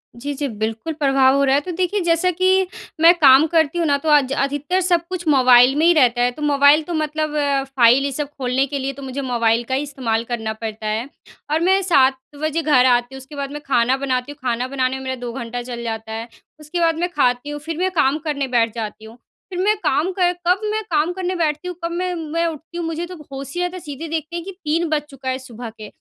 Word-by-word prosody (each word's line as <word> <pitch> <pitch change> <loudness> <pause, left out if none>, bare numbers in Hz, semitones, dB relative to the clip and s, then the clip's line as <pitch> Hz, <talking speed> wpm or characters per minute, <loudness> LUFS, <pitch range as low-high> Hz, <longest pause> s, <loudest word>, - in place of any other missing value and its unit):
जी, 285 +4 -5
जी, 285 0 -3
बिल्कुल 225 +8 -3
प्रभाव 270 -3 +3
हो 280 - +2
रहा 270 0 +3
है। 290 - +2
तो 360 - -6
देखिए, 370 +4 -1
जैसा 335 +1 +2
कि 375 +1 +2 0.3
मैं 335 +2 +8
काम 275 +1 +7
करती 320 0 +1
हूँ 335 - +1
ना, 285 0 +3
तो 310 +2 -3
आज 285 -3 +4
अधिकतर 290 +7 -1
सब 345 -2 +1
कुछ 350 -3 -5
मोबाइल 255 -2 +6
में 315 +2 +2
ही 345 - +6
रहता 245 -5 +3
है, 245 0 +2
तो 300 - -12
मोबाइल 290 +1 +5
तो 345 - -6
मतलब 310 -1 -2 0.4
फ़ाइल, 250 +3 +5
ये 280 - -1
सब 290 +1 -3
खोलने 260 +1 0
के 280 +1 -3
लिए 270 +1 -3
तो 280 - -11
मुझे 265 +1 -4
मोबाइल 235 -2 +1
का 260 +2 -2
ही 280 - -1
इस्तेमाल 235 -6 -2
करना 220 -2 -2
पड़ता 220 -1 -6
है 220 +4 -2 0.4
और 315 - +2
मैं 380 +2 +3
7 270 -8 +3 0.2
बजे 310 +1 0
घर 280 -5 +4
आती 245 +1 +2
हूँ, - - -7
उसके 270 +3 -11
बाद 280 0 -4
मैं 295 0 -7
खाना 255 0 +2
बनाती 260 0 -2
हूँ, 290 - -13
खाना 240 +2 -1
बनाने 260 -1 -1
में 265 - -8
मेरा 260 0 -3
2 245 -1 -6
घंटा 245 -1 -5
चल 240 -1 -7
जाता 225 -1 -5
है। 225 +1 -5 0.3
उसके 305 +4 -5
बाद 330 -1 +2
मैं 355 +1 0
खाती 255 -3 0
हूँ, 295 0 -5
फिर 320 +2 -6
मैं 370 +1 0
काम 300 -4 +2
करने 285 -3 -2
बैठ 230 -3 +1
जाती 220 -1 -6
हूँ। 225 +2 -13 0.3
फिर 360 -1 -5
मैं 420 +3 +3
काम 300 +7 +1
कर 355 -1 +3 0.2
कब 365 +2 +4
मैं 435 0 -1
काम 315 +4 +2
करने 370 -1 -4
मैं 365 -1 -2
बैठती 310 +1 -1
हूँ, 360 - -5
कब 335 - -2
मैं 360 +1 -2
मैं 330 +1 -2
उठती 330 +2 -7
हूँ, 340 - -3
मुझे 330 +1 -3
तो 365 +1 -9
अब 300 -3 -13
होश 275 0 -7
ही 355 - -1
आता 355 +1 -3
है, - - -6
सीधे 305 0 -7
देखते 320 +1 -4
हैं 340 - -4
कि 390 - -6
3 335 -2 -2
बज 305 -1 +1
चुका 265 -1 -6
है 260 - -1
सुबह 240 -2 -9
के, 215 -1 -11
285 Hz, 260 wpm, -20 LUFS, 255-330 Hz, 0.4 s, मैं